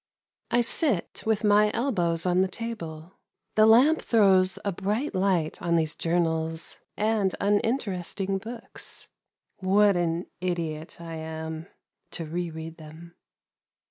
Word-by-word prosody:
I 240 - +3
sit 235 - +1
with 220 -1 +1
my 210 0 +5
elbows 175 -10 0
on 180 0 +3
the 190 - +3
table, 180 -6 -7 0.3
the 215 0 +5
lamp 260 +8 +6
throws 190 -5 +4
a 200 - +1
bright 210 - -2
light 185 -4 0
on 170 -1 +1
these 160 -1 +1
journals 165 -1 -1 0.2
and 210 -3 +1
uninteresting 200 -3 0
books. 230 +3 -8 0.5
What 200 +1 +4
an 170 0 0
idiot 170 -4 -3
I 165 -1 -7
am 160 +1 -6 0.5
to 165 - -4
re 170 +2 -3
read 160 0 -8
them 160 +2 -12
185 Hz, 125 wpm, -27 LUFS, 165-210 Hz, 0.5 s, lamp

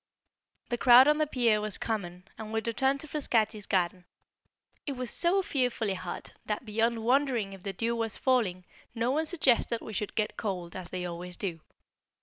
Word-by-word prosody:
The 240 -1 -2
crowd 250 +1 +8
on 300 +1 +3
the 305 - +2
pier 235 -6 +2
was 210 -1 +1
common, 180 -4 -4
and 220 -1 -8
we 225 - 0
returned 265 +5 0
to 310 - -9
Frascati's 220 -8 0
garden. 180 -1 0 0.8
It 280 - -1
was 250 -2 -3
so 365 +3 +4
fearfully 245 - 0
hot, 185 -2 -7
that 215 +4 -3
beyond 225 +1 0
wondering 250 -6 +1
if 195 - -11
the 195 - -3
dew 230 +5 -1
was 225 -2 -2
falling, 210 -9 +1 0.3
no 235 +2 0
one 310 +3 0
suggested 255 -8 +2
we 220 - -9
should 210 0 -3
get 215 -1 -1
cold, 180 -5 -4
as 185 -2 -6
they 180 -1 -4
always 175 +1 -6
do. 175 -5 -3
225 Hz, 180 wpm, -29 LUFS, 195-255 Hz, 0.8 s, crowd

